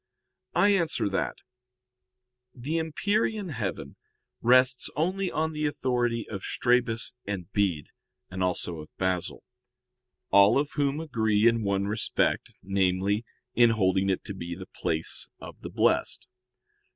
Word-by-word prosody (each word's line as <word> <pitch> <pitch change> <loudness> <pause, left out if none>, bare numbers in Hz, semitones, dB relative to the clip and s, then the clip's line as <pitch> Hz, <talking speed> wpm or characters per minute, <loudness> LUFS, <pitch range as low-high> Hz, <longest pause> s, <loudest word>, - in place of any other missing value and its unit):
I 205 - +5
answer 175 - +2
that, 95 - -2 1.2
The 145 +7 -2
empyrean 205 +5 0
heaven 100 - -4 0.4
rests 130 +1 +4
only 185 +5 0
on 160 +1 -1
the 150 0 0
authority 120 -5 -1
of 100 -3 -6
Strabus 120 0 +1
and 95 -4 -4
Bede, 95 -8 0 0.4
and 95 0 -6
also 90 -2 0
of 75 - -10
Basil; 95 -2 -1 0.9
all 100 +4 +6
of 145 +1 0
whom 145 0 0
agree 110 -8 +2
in 115 -1 +3
one 100 -1 0
respect, 105 +1 0
namely, 95 +2 +1 0.3
in 120 -1 +6
holding 95 -3 +2
it 95 - 0
to 100 - -5
be 85 -2 -6
the 95 +1 -10
place 80 0 -2
of - - -11
the - - -6
blessed. - - +1
115 Hz, 130 wpm, -27 LUFS, 95-145 Hz, 1.2 s, all